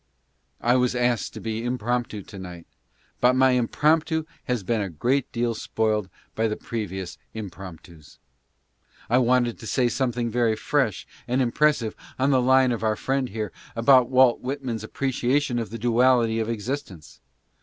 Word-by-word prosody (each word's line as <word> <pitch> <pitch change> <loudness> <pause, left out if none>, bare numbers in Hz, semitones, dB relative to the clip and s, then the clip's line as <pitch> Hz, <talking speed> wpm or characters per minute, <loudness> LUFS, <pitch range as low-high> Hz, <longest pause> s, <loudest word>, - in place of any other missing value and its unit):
I 120 +2 +3
was 125 0 +1
asked 120 -2 0
to - - -6
be 110 0 -4
impromptu, 120 -3 -2
to 100 - -11
night, 90 -2 -9 0.5
but 125 +1 +4
my 130 0 +5
impromptu 155 +6 +1 0.2
een 120 -5 -1
a 100 - -3
great 125 - 0
deal 120 0 0
spoiled 110 -3 -1 0.2
by 110 0 0
the 105 - -2
previous 95 -7 -5 0.2
impromptus. 90 -6 -10 0.9
I 125 - +5
wanted 125 -1 +2
t: 115 - -8
say 125 +1 +2
something 120 -2 -1
very 115 -1 +2
fresh - - 0 0.2
and 125 +2 0
impressive 130 -2 +1 0.2
on 135 +2 +2
the 130 -2 +4
line 130 0 +4
of 120 - -2
our 110 -1 +1
friend 135 +2 -1
here, 110 0 -4 0.2
about 125 +1 +5
Walt 130 -2 +5
Whitman's 130 -4 -4
appreciation 130 +2 0
of 115 - -4
the 115 - -6
duality 120 0 +3
of 110 0 -2
existence. 100 - -5
120 Hz, 155 wpm, -24 LUFS, 110-130 Hz, 0.9 s, my